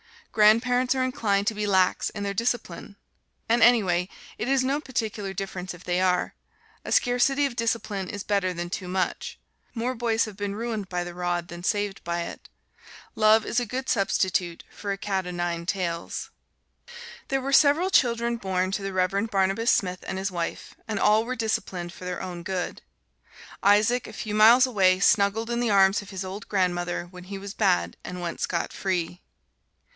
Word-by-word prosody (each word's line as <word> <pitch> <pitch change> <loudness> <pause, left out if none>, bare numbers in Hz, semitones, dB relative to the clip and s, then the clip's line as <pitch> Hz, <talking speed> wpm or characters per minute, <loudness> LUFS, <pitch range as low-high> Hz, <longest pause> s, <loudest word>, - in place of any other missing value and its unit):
Grandparents 245 +4 +4
are 260 - +1
inclined 205 -6 0
to 220 - +1
be 210 0 -2
lax 190 -2 +2
in 205 - -5
their 200 0 -2
discipline. 230 -1 -3 0.5
And 235 +1 +3
anyway 190 -7 +4 0.3
it 220 - -3
is 270 -1 +2
no 275 +3 0
particular 220 -8 -3
difference 185 -1 -5
if 175 - -15
they 180 0 0
are: 180 -1 +1 0.5
a - - -5
scarcity 260 +3 +3
of 270 -4 -3
discipline 220 -5 -2
is 205 -1 -5
better 200 -3 0
than 175 0 -5
too 185 0 -5
much. 185 -1 -2 0.4
More 240 +2 -1
boys 230 -2 +1
have 210 -3 -10
been 205 -1 -3
ruined 220 -3 -3
by 180 -1 -2
the 175 0 -7
rod 175 -1 -2
than 175 0 -8
saved 205 0 -1
by 170 0 -1
it - - -8 0.6
love 215 0 +4
is 240 - 0
a 245 - -2
good 255 +4 -4
substitute 185 -4 0
for 200 - -5
a 195 - -2
cat 190 -2 -2
'o - - -4
nine 175 -1 -3
tails. 175 -3 -3 1.0
There 270 0 0
were 275 +1 -3
several 310 +7 +5
children 235 -3 +2
born 185 -2 -1
to 200 - -2
the 195 0 -4
Reverend 195 +4 0
Barnabas 195 +3 +2
Smith 180 -2 0
and 190 - -3
his 195 +1 -2
wife, 170 -2 -4
and 220 -2 -2
all 215 +2 +4
were 255 +2 -3
disciplined 185 -6 -3
for 175 +3 -10
their 180 -1 -4
own 180 -2 -6
good. 185 0 -4 0.8
Isaac, 210 +5 +3
a 215 - -10
few 215 -1 -5
miles 230 +4 +7
away, 190 -7 +3
snuggled 205 +3 +3
in 235 - 0
the 240 -1 +1
arms 195 0 +4
of 200 - -12
his 190 -1 -5
old 195 +2 -7
grandmother 175 -3 0
when 180 0 -12
he 195 +1 -6
was 195 +1 -7
bad 85 - +1
and 180 - -6
went 170 -1 -4
scot - - -2
free. 180 -2 -2
200 Hz, 185 wpm, -26 LUFS, 180-230 Hz, 1.0 s, miles